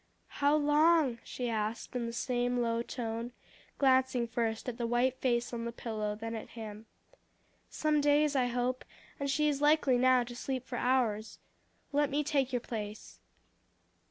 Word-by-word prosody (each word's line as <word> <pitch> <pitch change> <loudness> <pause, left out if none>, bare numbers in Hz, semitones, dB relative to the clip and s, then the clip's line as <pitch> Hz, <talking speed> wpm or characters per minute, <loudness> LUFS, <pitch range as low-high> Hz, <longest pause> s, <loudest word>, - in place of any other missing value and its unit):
"How 285 +1 +5
long?" 300 -3 +3
she 250 - -4
asked 220 +1 -3
in 240 -1 -1
the - - -4
same 245 +1 -1
low 230 -1 0
tone, 235 0 -4 0.4
glancing 260 -3 +3
first 225 -1 -2
at 240 -2 -4
the 235 - 0
white 245 +2 +1
face 240 -1 0
on 230 -1 -3
the 235 - -3
pillow, 215 -3 -3
then 225 +2 -5
at 220 - -6
him. 215 0 -8 0.8
"Some 305 -1 +1
days, 290 0 +3
I 255 -2 +3
hope; 250 +1 -1 0.4
and 280 0 -2
she 300 +2 +2
is 290 -1 0
likely 295 -4 +4
now 255 0 +5
to 240 0 -9
sleep 255 0 -4
for 245 - -5
hours. 225 -4 0 0.5
Let 290 0 +2
me 295 +1 0
take 275 -3 0
your 245 -2 -1
place." 215 -3 -7
245 Hz, 165 wpm, -31 LUFS, 230-275 Hz, 0.8 s, How